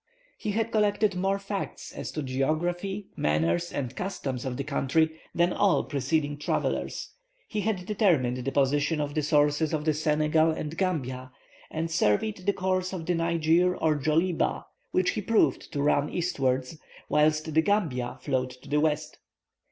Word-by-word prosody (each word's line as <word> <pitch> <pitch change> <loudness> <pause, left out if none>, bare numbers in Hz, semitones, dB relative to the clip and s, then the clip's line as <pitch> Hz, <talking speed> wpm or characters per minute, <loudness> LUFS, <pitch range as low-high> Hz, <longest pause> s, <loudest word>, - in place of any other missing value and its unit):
He 210 - -3
had 225 +1 0
collected 210 -2 +2
more 195 +2 +1
facts 200 0 -5
as - - -6
to 155 - -3
the - - -6
geography, 175 +9 -1
manners, 80 - +1
and 130 -4 -4
customs 135 -10 -4
of 125 -2 -3
the 140 - -2
country 145 +3 +1 0.2
than 175 +1 +3
all 200 -3 +3
preceding 145 +1 -1
travellers; 145 - -2 0.4
he 215 - -2
had 195 -3 -1
determined 170 - +2
the 130 +2 -3
position 145 +3 +2
of 145 -1 -2
the 155 - +1
sources 150 +1 +2
of 150 0 -3
the 155 - +3
Senegal 155 +1 +2
and 155 0 -3
Gambia, 130 -9 -2 0.4
and 165 +1 -3
surveyed 165 - +2
the 200 - +4
course 185 0 -1
of 170 -4 -4
the 180 - +1
Niger 170 +1 +2
or 155 -1 +2
Djoliba 160 +4 +1 0.2
which 185 0 +2
he - - -3
proved 220 +2 +1
to 140 -2 -1
run 145 0 +2
eastwards, 135 -5 -1 0.3
whilst 155 +1 +2
the 160 - +5
Gambia 160 -11 0
flowed 130 -1 0
to 125 0 -14
the 150 - +2
west. 155 0 -1
155 Hz, 165 wpm, -27 LUFS, 145-180 Hz, 0.4 s, the